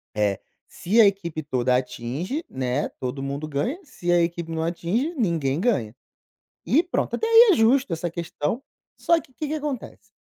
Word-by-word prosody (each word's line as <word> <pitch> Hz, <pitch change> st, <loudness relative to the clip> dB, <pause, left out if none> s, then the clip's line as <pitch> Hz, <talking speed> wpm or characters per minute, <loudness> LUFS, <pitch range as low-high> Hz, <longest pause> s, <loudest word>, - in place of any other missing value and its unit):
eh, 105 Hz, -2 st, +1 dB, 0.3 s
se 210 Hz, +7 st, 0 dB
a 225 Hz, -, +9 dB
equipe 180 Hz, -6 st, 0 dB
toda 125 Hz, -3 st, +1 dB
atinge, 130 Hz, -, -3 dB
né, 130 Hz, +2 st, -1 dB
todo 130 Hz, +1 st, -4 dB
mundo 140 Hz, +2 st, -4 dB
ganha, 190 Hz, -, -2 dB
se 180 Hz, -, -3 dB
a 175 Hz, 0 st, +5 dB
equipe 170 Hz, 0 st, -2 dB
não 160 Hz, 0 st, -2 dB
atinge, 180 Hz, -, -1 dB
ninguém 165 Hz, -, 0 dB
ganha. 130 Hz, -, 0 dB, 0.7 s
E 310 Hz, -, +3 dB
pronto, 355 Hz, -, -2 dB
até 450 Hz, -, -1 dB
aí 460 Hz, 0 st, +8 dB
é -, -, +3 dB
justo 230 Hz, -1 st, +3 dB
essa 165 Hz, +1 st, -2 dB
questão, 170 Hz, -, -3 dB, 0.4 s
só 335 Hz, -1 st, +3 dB
que 275 Hz, -, -20 dB
o 255 Hz, -, -28 dB
que 305 Hz, -, -4 dB
que 305 Hz, -, -2 dB
acontece, 280 Hz, -8 st, -5 dB
170 Hz, 180 wpm, -24 LUFS, -, 0.7 s, a